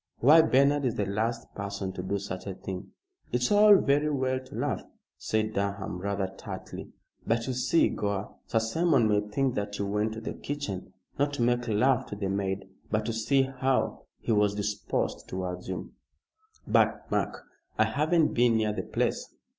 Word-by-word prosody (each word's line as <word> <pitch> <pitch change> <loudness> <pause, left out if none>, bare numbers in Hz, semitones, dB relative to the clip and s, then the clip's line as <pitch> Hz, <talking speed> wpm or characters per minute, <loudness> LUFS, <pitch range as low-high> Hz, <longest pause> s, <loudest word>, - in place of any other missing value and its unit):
"Why, 150 +6 +7
Bernard 140 -1 +3
is 125 -3 0
the 105 - 0
last 115 +4 -2
person 100 -1 -4
to 90 - -5
do 95 +2 -1
such 100 -1 -6
a 95 - -4
thing." 95 -1 -6 0.4
"It's 125 0 +1
all 210 0 +8
very 145 -3 +3
well 130 -2 0
to 130 - -12
laugh," - - -1 0.3
said 110 0 -1
Durham, 100 -2 -2
rather 100 +1 -1
tartly, - - -7 0.4
"but 115 +1 +1
you 130 - -2
see, 130 +7 +3
Gore, 100 -1 -3
Sir - - 0
Simon 125 +2 +3
may 105 -1 +3
think 120 +5 -1
that 105 -1 -3
you 100 - -1
went 105 +2 0
to 110 - -6
the - - -4
kitchen, 125 -12 -5 0.3
not 145 0 +2
to 125 - 0
make 120 0 +1
love 120 +4 +2
to - - -6
the 100 -2 -2
maid, 95 0 -2 0.2
but 110 0 0
to 115 - -1
see 135 +5 +2
how 130 0 -1
he - - -3
was 105 -1 +3
disposed 105 0 -2
towards 90 -1 -4
you." 95 -1 -5 0.7
"But, - - +2
Mark, - - -1 0.3
I - - +5
haven't 155 +2 +2
been 120 -1 +4
near 110 -1 +1
the - - -2
place." - - -2
110 Hz, 180 wpm, -28 LUFS, 100-130 Hz, 0.7 s, all